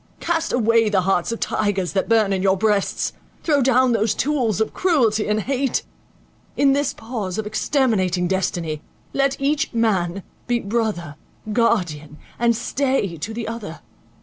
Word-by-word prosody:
Cast 330 -1 -1
away 230 -2 +3
the 195 -2 +2
hearts 185 +1 +1
of 230 - -4
tigers 200 -4 -1
that 195 - 0
burn 220 -3 +3
in 190 - 0
your 190 0 +3
breasts; 210 -1 0 0.3
throw 290 -4 +2
down 255 0 +4
those 220 -2 +1
tools 255 -8 0
of 220 - 0
cruelty 235 - +2
and 210 +1 +1
hate; 270 +3 -1 0.7
in 275 -1 +4
this 285 0 +1
pause 225 -6 -5
of 220 - -2
exterminating 210 - +1
destiny, 170 -4 -2 0.3
let 275 0 +1
each 295 +3 0
man 195 -5 +1 0.2
be 240 -1 +1
brother, 200 -9 -2 0.4
guardian, 165 - 0 0.2
and 235 0 +3
stay 255 -5 -1
to 205 +8 -4
the 225 0 -4
other. 220 -7 -6
220 Hz, 150 wpm, -21 LUFS, 190-255 Hz, 0.7 s, down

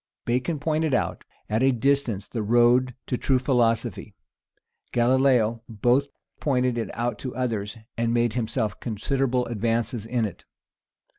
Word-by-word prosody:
Bacon 130 +7 0
pointed 155 -1 0
out - - -1 0.2
at 110 +2 0
a 135 +1 +5
distance 125 -5 0
the 115 - -4
road 120 +3 +3
to 125 - -2
true 135 - +2
philosophy: 120 -4 0 0.8
Galilaeo 120 -2 +3
both 120 +5 +2 0.3
pointed 125 -3 +1
it 115 -1 -2
out 120 -2 -2
to 130 - -5
others, 115 -5 -2 0.2
and 115 0 +1
made 120 -1 +2
himself 110 -3 -2
considerable 125 +3 -1
advances 115 0 -1
in 120 -1 0
it. 100 - -7
120 Hz, 135 wpm, -25 LUFS, 115-130 Hz, 0.8 s, a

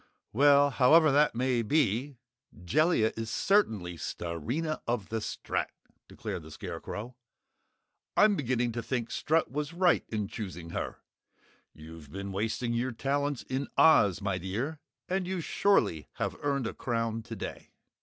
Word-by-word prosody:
"Well, 145 +3 +5
however 155 +4 +6
that 145 -2 +3
may 125 0 +1
be, 135 +1 +1 0.5
Jellia 145 - +3
is 115 0 -4
certainly 110 - +1
Starina 120 - -3
of 120 -4 -1
the 115 - -1
Strat!" - - -3 0.4
declared - - -5
the - - -12
Scarecrow. 120 +4 -7 1.0
"I'm 210 -1 +6
beginning 125 -5 0
to 115 +1 -3
think 120 -1 -3
Strut 160 -2 +1
was 150 +3 -3
right 180 0 +3
in 105 -2 -2
choosing 90 -6 -7
her! - - -4 0.7
You've 80 -2 -12
been 100 +2 -5
wasting 110 +4 -1
your 120 +2 -1
talents 140 +2 -1
in 130 +2 -3
Oz, 100 - +5
my 100 -2 -1
dear, 115 - -3 0.3
and 185 0 -1
you 185 -1 -2
surely 165 - +1
have - - -3
earned 140 -3 0
a 115 - -3
crown 115 -2 -2
today!" 115 -3 -7
120 Hz, 140 wpm, -30 LUFS, 105-145 Hz, 1.0 s, however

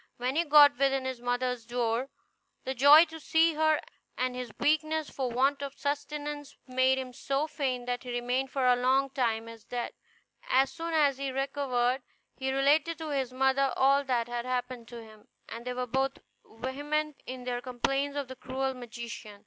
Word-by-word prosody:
When 250 +2 -2
he 335 - +3
got 290 -2 +7
within 270 -1 +2
his 260 -2 -4
mother's 245 0 -1
door, 240 +2 -1 0.5
the 265 - -2
joy 285 +6 +8
to 320 0 -10
see 320 +1 +3
her 315 0 +3 0.4
and 255 0 -1
his 250 -2 -5
weakness 310 0 +1
for 260 -2 -2
want 270 +4 +1
of 280 0 -6
sustenance 290 0 -4
made 260 0 +2
him 255 -1 -5
so 275 +4 -1
faint 260 -5 -2
that 245 0 -2
he 250 - -9
remained 245 +2 -1
for 270 -1 -1
a 250 0 +6
long 260 +2 +2
time 230 -4 -1
as 230 -2 -11
dead. 245 -1 -4 0.6
As 265 +1 +3
soon 330 0 -4
as 285 -4 +3
he 275 -1 -2
recovered 265 -2 0 0.3
he 265 0 -2
related 290 +4 +2
to 320 -1 -5
his 265 -3 -1
mother 265 +1 +2
all 275 +1 +4
that 240 -3 0
had 240 0 -3
happened 250 -1 -3
to 235 -1 -9
him, 215 -1 -16 0.2
and 230 +1 -8
they 250 - -1
were 250 0 -2
both 265 +2 -1 0.3
very 250 +4 -5
vehement 300 0 -2
in 255 0 -6
their 245 -1 -3
complaints 275 +3 -1
of 280 -2 -2
the 260 - -8
cruel 265 +1 -3
magician. 235 -4 -8
265 Hz, 190 wpm, -29 LUFS, 245-285 Hz, 0.6 s, joy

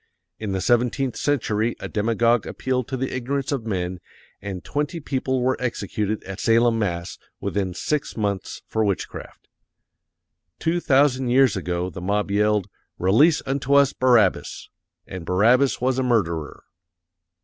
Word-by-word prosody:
In 105 -2 -4
the 95 -1 -1
seventeenth 125 +2 +1
century 115 -5 0
a - - -5
demagog 115 +1 +1
appealed 130 -2 -2
to 130 - -3
the 130 +1 -3
ignorance 135 +2 -2
of 135 -6 -2
men_ 90 -4 -3 0.4
AND 95 -3 -6
TWENTY 150 +3 -2
PEOPLE 130 -3 -1
WERE 130 +1 +1
EXECUTED 110 -3 -2
AT 95 +1 -7
SALEM, 115 0 +3
MASS., 85 -5 -3 0.2
WITHIN 95 -3 -2
SIX 145 +9 -2
MONTHS 100 -3 -3
FOR 110 - 0
WITCHCRAFT. 100 -3 -4 1.1
Two 170 +2 0
thousand 135 -4 +3
years 130 -2 +4
ago 90 -1 -2
the 90 - -8
mob 100 +2 -1
yelled, 105 -1 +2 0.3
"RELEASE 140 - +4
UNTO 140 +1 0
US 140 -1 +5
BARABBAS" 125 -3 +2 0.3
AND 95 -2 -7
BARABBAS 115 +10 +3
WAS 130 +1 +1
A - - +1
MURDERER! 85 - -1
115 Hz, 140 wpm, -23 LUFS, 100-130 Hz, 1.1 s, US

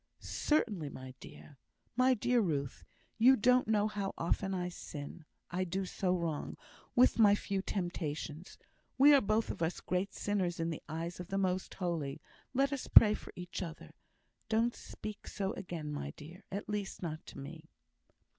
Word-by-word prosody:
"Certainly, 210 - 0
my 130 -1 -9
dear. 145 -3 -13 0.4
My 255 +1 +5
dear 245 +2 +2
Ruth, 140 - -2 0.4
you 255 +4 +8
don't 250 +1 +4
know 210 -1 +3
how 200 -2 -3
often 190 +3 0
I 180 -2 -1
sin; 150 -2 -8 0.3
I 180 +2 0
do 190 +2 -2
so 185 0 -1
wrong, 165 -4 -3 0.4
with 245 -1 +5
my 205 -2 +7
few 200 -1 -2
temptations. 170 -4 -4 0.4
We 285 +2 +8
are 280 - +7
both 215 +1 +1
of - - -8
us 165 +1 0
great 185 +2 -1
sinners 185 -5 -1
in 165 0 0
the 160 - -5
eyes 165 +3 -4
of 180 - -6
the 195 - -2
Most 185 -1 -1
Holy; 160 -6 -2 0.3
let 275 +2 +2
us 275 - -4
pray 210 -2 +9
for - - -7
each 180 +1 -6
other. 165 -3 -7 0.6
Don't 230 +2 +2
speak 215 -1 -8
so 195 -1 -2
again, 165 -5 -5
my 70 - -4
dear; 170 +5 -11
at 200 +2 -4
least, 205 -3 -3
not 155 -1 -4
to - - -10
me!" 140 - -9
185 Hz, 170 wpm, -33 LUFS, 165-210 Hz, 0.6 s, pray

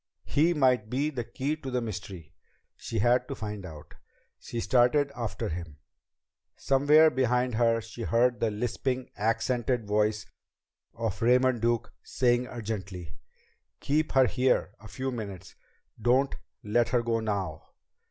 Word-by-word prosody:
He 165 +4 +2
might 125 -6 +2
be 140 +5 0
the 125 -4 -3
key 140 +5 -3
to 135 - -7
the 125 -1 0
mystery! 95 -7 -7 0.4
She 115 - -5
had 120 +4 +3
to 140 - -5
find 105 -3 -6
out! 75 -2 -12 0.5
She 120 - -6
started 130 +4 +3
after 115 -4 -3
him. 85 -3 -6 0.8
Somewhere 150 +4 +5
behind 125 -1 +1
her 115 0 +2
she 115 +1 -10
heard 120 +2 +2
the 115 - +1
lisping, 125 +4 -3
accented 120 +2 0
voice 105 0 +1 0.7
of 110 -4 -3
Raymond 125 0 +3
Duke 120 0 0
saying 125 0 +1
urgently: 100 - -6 0.7
"Keep 155 +2 0
her 130 -1 +6
here 125 +1 +1
a 110 - -12
few 130 +5 -4
minutes! 100 -7 -7 0.5
Don't 130 +5 +3 0.3
let 115 +3 +1
her 120 0 +1
go 115 -1 0
now!" 100 -8 -3
120 Hz, 140 wpm, -28 LUFS, 105-130 Hz, 0.8 s, her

